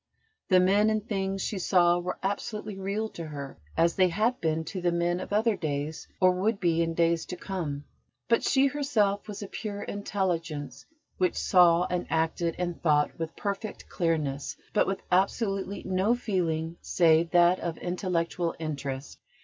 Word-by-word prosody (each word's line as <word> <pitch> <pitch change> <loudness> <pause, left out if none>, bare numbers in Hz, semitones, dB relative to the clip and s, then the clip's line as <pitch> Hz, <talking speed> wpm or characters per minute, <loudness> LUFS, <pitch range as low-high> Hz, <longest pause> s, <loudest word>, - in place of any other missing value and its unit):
The 185 -2 +6
men 200 +4 +4
and 215 0 -1
things 195 -2 -1
she 200 - -2
saw 175 -1 +4
were 180 +1 -4
absolutely 210 +1 -3
real 200 +3 -2
to 165 -5 -7
her, 140 - -7 0.2
as 170 0 +4
they 185 -1 +4
had 220 +8 0
been 160 0 0
to 180 +4 -5
the 175 0 +2
men 170 +1 0
of 185 - -7
other 215 +1 +2
days, 150 -2 -3
or 185 -1 +6
would 195 +4 0
be 170 -2 +2
in 165 0 -1
days 170 0 +2
to 180 - -5
come; 160 -8 -4 0.4
but 230 - +3
she 270 0 +4
herself 240 -9 +1
was 210 -1 -6
a - - -6
pure 205 0 -5
Intelligence 175 -7 -3 0.3
which 180 -2 +2
saw 175 -2 +5
and 180 -1 -2
acted 165 +1 0
and 175 -1 -3
thought 150 -2 +2
with 165 0 -4
perfect 200 +1 -4
clearness, 155 -6 -1 0.2
but 210 - +3
with 195 0 -2
absolutely 195 +1 0
no 190 +5 +2
feeling 170 -7 -1
save 165 -1 +3
that 175 +1 +5
of 170 -1 -3
intellectual 175 -1 -1
interest. 140 -3 -5
180 Hz, 165 wpm, -28 LUFS, 165-200 Hz, 0.4 s, The